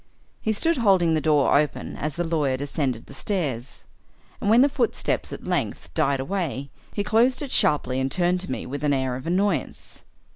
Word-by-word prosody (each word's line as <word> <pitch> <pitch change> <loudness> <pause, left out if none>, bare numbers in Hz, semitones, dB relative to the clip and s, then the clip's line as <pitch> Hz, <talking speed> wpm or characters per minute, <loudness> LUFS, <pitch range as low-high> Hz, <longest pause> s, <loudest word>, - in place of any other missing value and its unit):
He 220 - 0
stood 325 +10 +1
holding 190 -8 +4
the 155 - +1
door 150 -3 +3
open 150 +1 0
as 150 -1 -3
the 175 - -1
lawyer 150 -6 0
descended 135 -4 -2
the - - -13
stairs, 140 - -3 0.6
and 205 - 0
when 235 +4 +7
the - - +5
footsteps 285 - -1
at - - -7
length - - -2
died 135 -1 +1
away, 140 -3 -3 0.2
he 205 - -2
closed 235 +7 +2
it 275 - -6
sharply 130 -3 +2
and 130 0 -1
turned 180 +2 +1
to 180 - -3
me - - -4
with 145 +4 -5
an 145 -1 +2
air 130 -2 0
of 130 +4 -7
annoyance. 180 -4 -1
155 Hz, 190 wpm, -24 LUFS, 135-200 Hz, 0.6 s, when